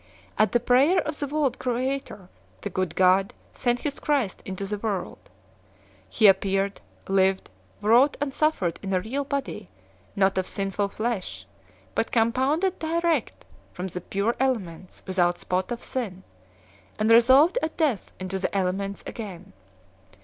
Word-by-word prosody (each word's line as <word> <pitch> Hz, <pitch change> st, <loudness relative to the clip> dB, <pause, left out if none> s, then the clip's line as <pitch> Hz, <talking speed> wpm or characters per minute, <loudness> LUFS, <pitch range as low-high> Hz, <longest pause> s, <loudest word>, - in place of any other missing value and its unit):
At 215 Hz, -2 st, +3 dB
the 240 Hz, -, +3 dB
prayer 260 Hz, +9 st, +4 dB
of 300 Hz, 0 st, -4 dB
the 285 Hz, -, -2 dB
world 280 Hz, -3 st, 0 dB
creator 255 Hz, -5 st, -3 dB, 0.3 s
the 205 Hz, -, -5 dB
Good 185 Hz, -3 st, -2 dB
God 190 Hz, +1 st, +3 dB, 0.2 s
sent 245 Hz, -1 st, 0 dB
his 285 Hz, -2 st, -3 dB
Christ 275 Hz, -10 st, 0 dB
into 190 Hz, +1 st, -4 dB
the 205 Hz, +1 st, -3 dB
world. 205 Hz, -3 st, -4 dB, 0.8 s
He 215 Hz, -, +2 dB
appeared, 195 Hz, 0 st, +3 dB, 0.3 s
lived, 190 Hz, -, +1 dB, 0.3 s
wrought 245 Hz, +7 st, +5 dB
and 290 Hz, -1 st, -1 dB
sufiered 265 Hz, -, +1 dB
in 195 Hz, -1 st, -3 dB
a -, -, +3 dB
real 255 Hz, +9 st, -3 dB
body, 270 Hz, -, -4 dB, 0.5 s
not 195 Hz, -1 st, +2 dB
of 185 Hz, -, -2 dB
sinful 195 Hz, +1 st, -1 dB
flesh, 195 Hz, -, -3 dB, 0.5 s
but -, -, -1 dB
compounded 265 Hz, +11 st, +1 dB
direct 335 Hz, +1 st, -1 dB, 0.3 s
from 180 Hz, -, -5 dB
the 180 Hz, -1 st, -5 dB
pure 200 Hz, +6 st, -1 dB
elements 190 Hz, -10 st, -2 dB
without 175 Hz, -2 st, +1 dB
spot 185 Hz, +4 st, -2 dB
of 240 Hz, -, -4 dB
sin, 195 Hz, -8 st, -4 dB, 0.7 s
and 215 Hz, +1 st, +2 dB
resolved 265 Hz, -, +6 dB
at 320 Hz, -, -3 dB
death 290 Hz, -, 0 dB
into 185 Hz, +1 st, -3 dB
the 195 Hz, -, -1 dB
elements 195 Hz, +1 st, -2 dB
again. 200 Hz, -7 st, -8 dB
215 Hz, 145 wpm, -25 LUFS, 190-265 Hz, 0.8 s, resolved